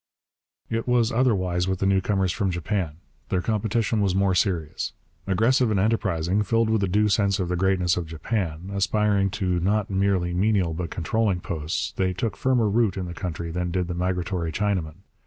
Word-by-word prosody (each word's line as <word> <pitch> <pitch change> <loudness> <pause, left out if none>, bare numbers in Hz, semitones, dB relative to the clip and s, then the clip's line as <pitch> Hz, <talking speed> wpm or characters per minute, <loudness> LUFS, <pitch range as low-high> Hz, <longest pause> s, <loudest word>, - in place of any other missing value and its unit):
It 115 +1 -2
was 120 -2 +3
otherwise 95 -8 +1
with 95 0 0
the 95 - -1
newcomers 95 -1 +2
from 100 +1 -1
Japan. 85 -2 -2 0.3
Their 90 -1 0
competition 110 +1 0
was 95 -2 +1
more 95 -1 +2
serious. 90 -5 -1 0.3
Aggressive 115 +6 +3
and 105 -3 +1
enterprising, 95 -3 +1
filled 115 +2 +1
with 110 -2 +2
a 100 - +1
due 105 +3 +2
sense 100 -1 +2
of 90 -2 -1
the 90 - 0
greatness 90 -1 +2
of 85 -2 -3
Japan, 85 +1 -3
aspiring 100 0 +2
to 90 -2 0
not 100 +3 0
merely 95 -2 +1
menial 95 -2 +1
but 85 0 -4
controlling 95 +3 0
posts, 80 -2 -3
they 95 -1 +1
took 105 +5 -2
firmer 125 -4 +2
root 105 -2 +1
in 95 - -3
the 85 - -6
country 85 -1 -4
than 90 +1 -2
did 90 0 -1
the 90 - -3
migratory 90 -1 -2
Chinaman. 95 -3 -2
95 Hz, 180 wpm, -25 LUFS, 90-105 Hz, 0.3 s, was